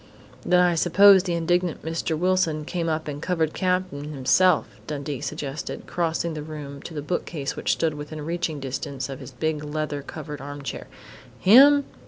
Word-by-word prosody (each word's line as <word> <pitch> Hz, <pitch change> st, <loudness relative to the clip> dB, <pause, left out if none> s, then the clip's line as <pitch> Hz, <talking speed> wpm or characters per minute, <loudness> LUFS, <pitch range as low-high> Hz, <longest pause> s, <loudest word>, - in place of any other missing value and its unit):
"Then 180 Hz, 0 st, +3 dB
I 180 Hz, -1 st, +4 dB
suppose 190 Hz, +4 st, +6 dB
the 180 Hz, -2 st, -2 dB
indignant 175 Hz, 0 st, 0 dB
Mr. 160 Hz, 0 st, -2 dB
Wilson 170 Hz, -3 st, +1 dB
came 170 Hz, 0 st, -2 dB
up 155 Hz, 0 st, -2 dB
and 145 Hz, 0 st, -5 dB
covered 165 Hz, -3 st, 0 dB
Cap'n 180 Hz, -6 st, -1 dB
himself," 155 Hz, +4 st, +3 dB, 0.2 s
Dundee 145 Hz, -2 st, -4 dB
suggested, 150 Hz, -1 st, -5 dB
crossing 170 Hz, -1 st, -1 dB
the 155 Hz, -, -5 dB
room 145 Hz, -2 st, -8 dB
to 165 Hz, -, -9 dB
the 145 Hz, -, -4 dB
bookcase 150 Hz, -3 st, -3 dB
which -, -, 0 dB
stood 160 Hz, -2 st, 0 dB
within 150 Hz, 0 st, -7 dB
reaching 165 Hz, -2 st, -2 dB
distance 135 Hz, 0 st, -4 dB
of 135 Hz, -, -6 dB
his -, -, -9 dB
big 150 Hz, +4 st, -2 dB
leather 150 Hz, -1 st, -3 dB
covered 150 Hz, 0 st, -8 dB
armchair. 145 Hz, 0 st, -6 dB, 0.5 s
"Him?" 280 Hz, -, +7 dB
155 Hz, 165 wpm, -24 LUFS, 145-175 Hz, 0.5 s, Him